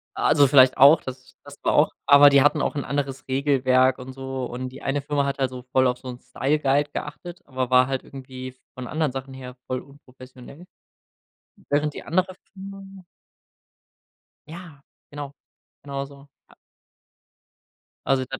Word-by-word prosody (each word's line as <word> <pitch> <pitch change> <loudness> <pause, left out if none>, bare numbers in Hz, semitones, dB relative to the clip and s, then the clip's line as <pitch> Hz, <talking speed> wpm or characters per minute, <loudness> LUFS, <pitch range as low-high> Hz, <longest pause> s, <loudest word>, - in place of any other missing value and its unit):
Also 145 -2 +4
vielleicht 130 -1 +6
auch, 140 +4 +7
das 130 0 -10
das - - -13
war - - +1
auch, - - +4
aber 145 0 +8
die 140 -1 +5
hatten 145 0 +3
auch - - -1
'n 140 - -2
anderes 135 -1 -4
Regelwerk 130 -1 +2
und 130 +1 -9
so. 130 -1 -5
Und 125 +1 -6
die 130 +2 -12
eine 140 +1 -1
Firma 140 0 -1
hat 140 0 -3
halt 135 -1 +1
so 125 0 -9
voll 130 0 +3
auf 125 0 -1
so 130 - -12
'n 125 -1 -8
Styleguide 145 +2 0
geachtet, 175 +4 -7
aber 130 -2 -3
war 125 0 +5
halt 135 -1 -3
irgendwie 130 -1 -9 0.2
von 130 -1 -7
anderen 155 0 -1
Sachen 135 +1 -7
her 125 -1 -10
voll 130 0 -2
unprofessionell. 130 +2 -15 1.1
Während 145 +1 +1
die - - -8
andere 185 +2 -1 0.2
Firma 195 -1 -11 1.4
Ja, 160 -3 -11 0.3
genau, 145 -1 -7 0.5
genau 140 -1 -4
so. 140 0 -16 1.8
Also 135 -1 +2
das 135 - -5
135 Hz, 160 wpm, -23 LUFS, 130-145 Hz, 1.8 s, aber